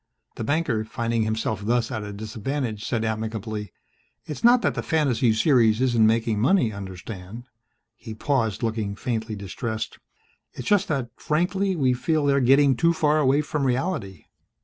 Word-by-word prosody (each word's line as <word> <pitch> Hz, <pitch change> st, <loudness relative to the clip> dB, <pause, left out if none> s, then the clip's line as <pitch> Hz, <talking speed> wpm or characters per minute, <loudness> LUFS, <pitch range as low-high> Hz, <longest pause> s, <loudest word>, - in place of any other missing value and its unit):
The -, -, -5 dB
banker, 140 Hz, -4 st, 0 dB
finding 115 Hz, 0 st, -2 dB
himself 110 Hz, -1 st, -1 dB
thus 120 Hz, +2 st, 0 dB
at 110 Hz, -, -3 dB
a 105 Hz, 0 st, -6 dB
disadvantage, 110 Hz, +2 st, -4 dB
said 115 Hz, -2 st, -1 dB
amicably, 110 Hz, -2 st, -4 dB, 0.5 s
"It's 150 Hz, -, -7 dB
not 240 Hz, +1 st, +6 dB
that -, -, +2 dB
the -, -, -3 dB
fantasy 135 Hz, -7 st, +2 dB
series 110 Hz, -2 st, +3 dB
isn't 120 Hz, -4 st, +3 dB
making 110 Hz, -1 st, +1 dB
money, 130 Hz, -, +3 dB
understand." 95 Hz, +2 st, -8 dB, 0.5 s
He 115 Hz, -3 st, -9 dB
paused, 115 Hz, -4 st, -1 dB
looking 110 Hz, -3 st, -2 dB
faintly 110 Hz, -1 st, -3 dB
distressed. 110 Hz, +3 st, -5 dB, 0.5 s
"It's 125 Hz, -, -7 dB
just 205 Hz, -1 st, +3 dB
that, 135 Hz, -6 st, -2 dB
frankly, 185 Hz, +5 st, 0 dB
we 130 Hz, -6 st, +2 dB
feel 150 Hz, +4 st, 0 dB
they're 140 Hz, -1 st, +3 dB
getting 135 Hz, +2 st, +5 dB
too 165 Hz, +8 st, +3 dB
far 155 Hz, -1 st, +2 dB
away 140 Hz, 0 st, +3 dB
from 150 Hz, -1 st, -3 dB
reality. 125 Hz, -, -2 dB
115 Hz, 155 wpm, -24 LUFS, 110-145 Hz, 0.5 s, not